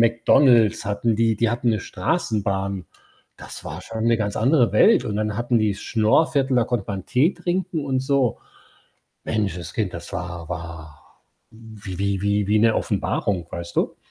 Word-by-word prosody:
McDonald's, 115 -1 +4
hatten 105 +3 0
die. 115 -1 +2
Die 115 +1 +1
hatten 120 0 -1
'ne 110 - 0
Straßenbahn. 100 - -2 0.5
Das - - -10
war - - -6
schon 110 0 -5
'ne 115 -1 +4
ganz 105 -2 -2
andere 125 -2 +3
Welt 105 - +5
und 105 - -3
dann 105 -1 -2
hatten 120 +1 0
die 110 -1 +2
das 100 - -9
Schnoorviertel, 130 +4 +2
da 120 - +3
konnte 120 -4 -2
man 95 -2 -5
Tee 145 +9 +2
trinken 175 -4 -2
und 130 -2 0
so. 135 -3 +1 0.9
Menschenskind, 95 -6 -2
das - - -8
war 85 -2 -6
war 80 -3 -9 0.3
wie 110 -5 -10
wie 100 -1 -1
wie 100 0 +1
wie 110 - +3
'ne 115 0 +4
Offenbarung, 90 -5 -1
weißt 85 0 -7
du? - - 0
110 Hz, 165 wpm, -22 LUFS, 100-120 Hz, 0.9 s, Welt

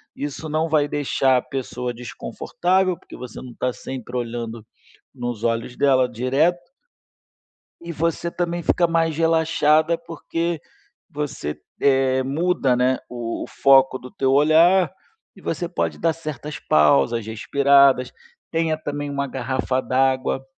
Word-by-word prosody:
Isso 145 +2 -5
não 160 +2 0
vai 150 -2 +2
deixar 135 -3 +1
a - - +1
pessoa 125 -2 -4
desconfortável, 180 +9 -1
porque - - -13
você 125 -2 -8
não 125 - -9
está 125 -1 -2
sempre 125 -2 -7
olhando 115 -2 -5 0.5
nos 120 -3 -5
olhos 115 +1 -1
dela 130 -3 +3
direto 145 +9 0 1.1
e 170 0 -7
você 165 +2 -1
também 175 0 -2
fica 175 +1 +2
mais 165 -2 0
relaxada, 160 0 +3
porque 165 -1 -4 0.5
você, 140 - -4 0.2
eh, 130 -1 +3
muda, 140 -2 +1
né, 130 +1 +2
o 120 -2 -5
o - - -5
foco 135 -1 +4
do 125 - -11
teu 135 -1 0
olhar 165 +6 +5 0.4
e - - -16
você 175 - -3
pode 175 - -2
dar 165 -1 +2
certas 150 -2 -7
pausas, 75 - +3
respiradas. 140 +3 +3 0.4
Tenha 160 -1 0
também 145 -1 -5
uma 140 0 -2
garrafa 130 0 -2
d'água 130 0 0
140 Hz, 135 wpm, -22 LUFS, 125-160 Hz, 1.1 s, olhar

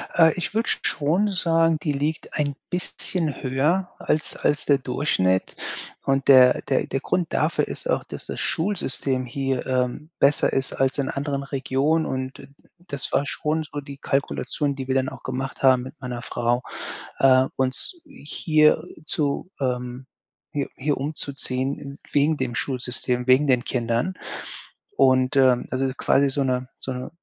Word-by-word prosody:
Äh, 160 -2 +6
ich 180 +2 -3
würde 225 +1 0
sch - - +1
schon 175 +8 +2
sagen, 165 -2 +3
die 150 - 0
liegt 150 +3 -2
ein 145 -2 -1
bisschen 175 -3 -2
höher 150 +9 +1
als 155 0 -1
als 145 0 0
der 140 -1 +4
Durchschnitt 125 -9 0 0.5
und 135 0 +1
der 130 -2 +7
der 135 - 0
der 135 - -1
Grund 175 +3 -1
dafür 155 +2 +1
ist - - -5
auch, - - +1
dass - - -8
das - - -4
Schulsystem 140 -8 +1
hier, 135 0 -2
ähm, 130 +4 -1
besser 140 +1 +3
ist 135 0 0
als 135 +1 +1
in 140 - -1
anderen 140 0 -2
Regionen 140 +4 0
und 130 0 -3
d - - -12 0.4
das 140 -4 -3
war 140 - +2
schon 155 +2 -1
so 145 -1 -6
die 140 -1 -9
Kalkulation, 140 +1 -1
die 135 -1 -6
wir 130 - +1
dann 130 0 +2
auch - - -12
gemacht 130 +1 -4
haben 130 -2 +5
mit 130 - -8
meiner 125 -2 -5
Frau. 120 0 0 0.6
Äh, 130 -1 +6
uns 130 - -1
hier 155 - +2 0.2
zu, 150 +2 0
ähm 125 0 -2 0.5
hi 140 -2 -1
hier 145 +2 0
umzuziehen 140 -1 -3
wegen 145 +2 +3
dem 130 -2 -2
Schulsystem, 125 -1 -1
wegen 130 +3 +5
den 125 -2 +3
Kindern. 120 +8 -1 0.8
Und, 130 0 +4
ähm, 130 -2 +4
also, 130 +1 0
quasi 140 0 +3
so 140 +1 +2
'ne 130 0 -1
so 130 - -3
'ne 125 +3 -5
135 Hz, 160 wpm, -24 LUFS, 130-150 Hz, 0.8 s, der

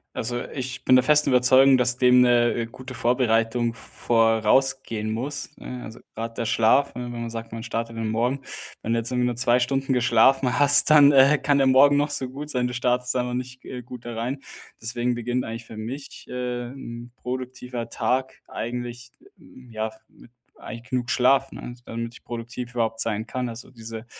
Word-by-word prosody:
Also, 120 +1 -3
ich 130 -2 -5
bin 130 - +6
der 130 - +6
festen 150 0 +4
Überzeugung, 130 +2 +6
dass 125 0 +2
dem 125 -1 +5
'ne, 120 -1 +4
äh, 115 -1 -2
gute 130 +2 -10
Vorbereitung 120 -1 +1
v 115 - -15
v - - -15 0.4
vorausgehen 115 -2 +1
muss, 135 +6 -4
ne? 125 -1 -8
Also, 110 - -10
grad 115 +1 -6
der 115 - -2
Schlaf, 115 +5 +3
ne, 125 +1 -5
wenn 120 -1 -6
man 115 - -4
sagt, 115 -1 -7
man 115 0 -6
startet 115 0 -4
den 110 -1 -2
Morgen. 120 +5 0 0.4
Wenn 115 - -1
du 115 - +2
jetzt 115 - -1
irgendwie 125 -1 +1
nur 120 -1 -1
2 120 0 +3
Stunden 135 +2 -1
geschlafen 125 +1 +3
hast, 145 +1 +5
dann, 145 -2 +8
äh, 140 +1 +6
kann 145 -1 +2
der 135 - +3
Morgen 140 +2 +6
noch 145 +1 +1
so 135 -3 -3
gut 145 +3 -6
sein. 125 -1 0
Du 125 - -5
startest 125 +1 0
da 125 - +2
aber 125 0 -4
nicht, 125 0 -6
äh, 125 -1 -7
gut 125 0 -11
da 120 - -5
rein, 120 +5 -3 0.4
deswegen 120 +1 -2
beginnt 120 +1 -2
eigentlich 115 0 -7
für 110 - -11
mich, 130 +6 -8
äh, 125 -1 -4
'n 120 -3 -9
produktiver 125 -1 -6
Tag 130 +1 -1
eigentlich 120 0 -6 0.6
ja, 110 -1 -3 0.2
mit - - -19 0.3
eigentlich 115 +2 -9
genug 125 -2 -1
Schlaf, 135 +2 +3
ne, 120 - -8
damit 115 0 -5
ich - - -15
produktiv 120 +1 -7
überhaupt 115 -1 -1
sein 110 -1 -2
kann. 125 -1 -3
Also, 115 +2 -8
diese 115 -1 -9
125 Hz, 200 wpm, -24 LUFS, 115-130 Hz, 0.6 s, dann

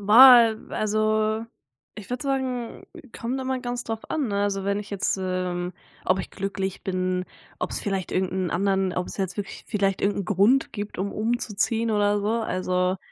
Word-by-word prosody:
Boah, 230 +1 +8
also 215 +1 +1 0.5
ich 210 - -9
würde 250 +2 -3
sagen, 260 -4 -2 0.3
kommt 255 +3 -2
immer 260 0 -1
ganz 245 -1 -3
drauf 225 -2 -5
an, 290 -7 -1
ne, 200 0 0
also 195 -1 -1
wenn 200 0 0
ich 210 - -7
jetzt, 195 -1 -1
ähm 180 -1 -2 0.3
ob 190 +1 +2
ich - - -8
glücklich 195 -1 -4
bin, 185 -1 -1 0.3
ob's - - -3
vielleicht 195 -3 -2
irgend 185 -1 0
'n 185 -2 -1
anderen 190 0 +1
ob's 180 0 -3
jetzt 190 -1 -2
wirklich 205 - -6
vielleicht 195 -3 0
irgend 200 0 +1
'n - - -4
Grund 210 +7 +3
gibt, 205 -3 -6
um 200 +1 -1
umzuziehen 225 0 0
oder 205 -1 +2
so, 205 - -1
also 185 -3 0
205 Hz, 175 wpm, -25 LUFS, 190-225 Hz, 0.5 s, Boah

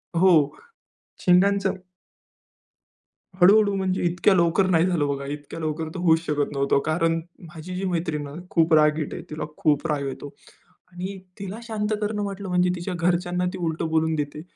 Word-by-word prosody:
हो. 165 -5 +4 0.6
शिंगांचं 195 +2 +3 1.7
हळू-हळू 200 +3 +6
म्हणजे, 190 -1 -1
इतक्या 180 +3 +3
लवकर 170 +2 +3
नाही 165 -2 +4
झालं 170 -6 +1
बघा. 140 -1 -3
इतक्या 145 +2 -7
लवकर 155 0 -3
तर 185 - -5
होऊच 165 -2 +4
शकत 145 -2 -1
नव्हतं, 140 0 +2
कारण 165 +1 +1 0.3
माझी 175 +3 -7
जी 190 +2 -3
मैत्रीण 160 -4 -2
आहे 140 - -10
ना, 175 - -9
खूप 165 -1 +2
रागीट 150 0 +3
आहे. - - -6
तिला 155 - -4
खूप 150 -2 +1
राग 145 -2 -1
येतो 140 +1 -7 0.6
आणि 185 +2 -6 0.2
तिला 195 +2 -6
शांत 220 -2 -3
करणं 210 0 -2
म्हटलं 200 -1 -5
म्हणजे 180 0 +2
तिच्या 180 +1 -4
घरच्यांना 175 +1 0
ती 190 - -6
उलटं 165 -2 -2
बोलून 160 0 +1
देते. 150 0 -4
170 Hz, 165 wpm, -24 LUFS, 155-185 Hz, 1.7 s, हळू-हळू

